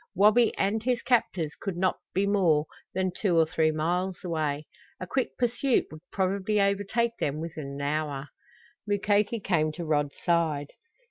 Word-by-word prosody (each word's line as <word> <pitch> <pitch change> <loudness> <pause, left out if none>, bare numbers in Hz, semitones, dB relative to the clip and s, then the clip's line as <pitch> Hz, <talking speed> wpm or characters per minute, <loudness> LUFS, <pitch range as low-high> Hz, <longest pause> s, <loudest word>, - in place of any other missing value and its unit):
Wabi 215 +5 +5
and 205 +3 +1
his 245 +1 0
captors 180 - +1
could 195 -4 -3
not 185 +1 +1
be 195 +2 +1
more 175 -7 +3 0.3
than 185 0 0
two 180 -6 +1
or 165 - +6
three 160 0 +1
miles 175 +4 -1
away. 155 -4 -2 0.3
A - - -4
quick 260 +7 -2
pursuit 245 +2 +1
would 155 0 -10
probably 200 +2 0
overtake 205 +4 +1
them 145 +1 -1
within 160 -3 -5
an 140 - -6
hour. 145 -1 -2 0.6
Mukoki 205 +2 +1
came 165 -6 +1
to 170 +1 -5
Rod's 145 -2 0
side. 160 -4 +1
185 Hz, 155 wpm, -28 LUFS, 155-205 Hz, 0.6 s, or